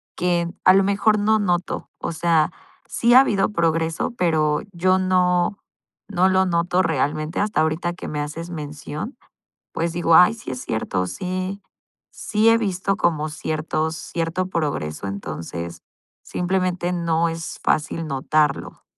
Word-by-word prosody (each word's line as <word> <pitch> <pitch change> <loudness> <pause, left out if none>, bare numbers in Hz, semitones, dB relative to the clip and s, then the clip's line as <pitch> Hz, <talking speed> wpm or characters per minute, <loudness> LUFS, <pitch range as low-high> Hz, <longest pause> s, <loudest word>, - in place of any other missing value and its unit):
que 175 -1 0
a 185 - +7
lo 195 - +5
mejor 205 +2 +2
no 215 +1 +3
noto, 180 -3 -1
o - - -3
sea, 160 -1 +2 0.3
sí 235 +1 +2
ha 255 - +10
habido 205 -7 +1
progreso, 165 0 0
pero 155 -4 +2
yo 185 +1 +2
no, 180 0 +2 0.5
no 190 -2 +2
lo 190 0 +3
noto 175 +1 +1
realmente 155 0 -1
hasta 210 -4 +1
ahorita 160 +2 0
que 175 - -8
me 150 -1 -3
haces 165 +4 -5
mención, 150 - -6 0.6
pues 165 +1 -1
digo: 170 -1 +3
"Ay, 180 +5 +7
sí 225 -11 -7
es 125 -1 -5
cierto, 100 -4 -2
sí, 185 - -4 0.5
sí 215 +1 0
he 230 - +5
visto 195 -3 -1
como 155 -5 +1
ciertos 155 +1 -2
cierto 170 +3 -2
progreso". 145 - -3
Entonces 85 -2 -6 0.4
simplemente 180 -1 -1
no 170 -1 +1
es 165 0 -6
fácil 160 +1 0
notarlo. 145 +1 0
170 Hz, 140 wpm, -22 LUFS, 155-185 Hz, 0.6 s, ha